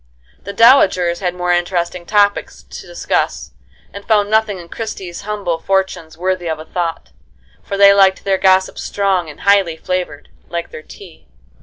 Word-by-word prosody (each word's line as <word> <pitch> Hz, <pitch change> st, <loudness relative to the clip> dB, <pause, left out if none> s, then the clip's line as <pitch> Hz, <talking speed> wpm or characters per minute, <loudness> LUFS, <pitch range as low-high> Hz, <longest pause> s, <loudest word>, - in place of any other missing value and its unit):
The 200 Hz, -, -5 dB
dowagers 195 Hz, -7 st, +4 dB
had 180 Hz, -2 st, -2 dB
more 180 Hz, 0 st, -1 dB
interesting 175 Hz, 0 st, -2 dB
topics 205 Hz, -1 st, 0 dB
to -, -, -11 dB
discuss, -, -, -2 dB, 0.4 s
and 200 Hz, -, -9 dB
found 210 Hz, -1 st, +1 dB
nothing 220 Hz, -2 st, +1 dB
in 175 Hz, -1 st, -11 dB
Christie's 190 Hz, -4 st, -7 dB
humble 200 Hz, -5 st, -3 dB
fortunes 190 Hz, -4 st, -2 dB
worthy 185 Hz, 0 st, -2 dB
of 160 Hz, -, -2 dB
a 155 Hz, -, -10 dB
thought, 165 Hz, -, -4 dB, 0.5 s
for 200 Hz, -, -5 dB
they 200 Hz, 0 st, +7 dB
liked 195 Hz, -1 st, +3 dB
their 195 Hz, -1 st, 0 dB
gossip 190 Hz, 0 st, +2 dB
strong 190 Hz, -4 st, -1 dB
and 150 Hz, -, -12 dB
highly 195 Hz, -5 st, +2 dB
flavored, 175 Hz, -5 st, -4 dB, 0.2 s
like 170 Hz, 0 st, -5 dB
their -, -, -9 dB
tea. 175 Hz, +1 st, -15 dB
185 Hz, 160 wpm, -17 LUFS, 170-200 Hz, 0.5 s, they